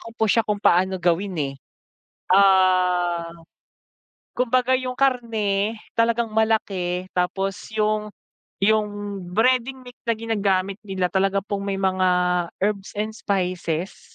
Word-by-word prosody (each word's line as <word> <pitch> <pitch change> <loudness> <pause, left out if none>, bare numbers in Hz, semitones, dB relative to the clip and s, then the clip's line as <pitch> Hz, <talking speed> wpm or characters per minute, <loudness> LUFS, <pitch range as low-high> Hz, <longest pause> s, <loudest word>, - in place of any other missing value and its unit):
ko 230 0 -12
po 220 - +1
siya 230 - +4
kung 210 - +1
paano 185 +2 +3
gawin, 180 +2 0 0.2
eh. - - -13 0.8
Ah, 180 -3 +3 1.1
kumbaga 255 +1 +2
yung 255 -1 -4
karne 225 -6 0 0.2
talagang 230 0 +2
malaki 195 -5 0
tapos 195 +2 0 0.2
yung 215 -1 0 0.5
yung 215 +1 +3 0.5
breading 255 +3 +2
mix 250 +1 -14
na 230 - +2
ginagamit 200 -3 -1
nila 185 -2 -1
talaga 195 +1 +1
pong 200 0 -4
may 195 -1 -2
mga 185 -1 +2 0.5
herbs 200 -1 -1
and 215 +1 -1
spices. 180 -3 -3
200 Hz, 120 wpm, -23 LUFS, 185-225 Hz, 1.1 s, siya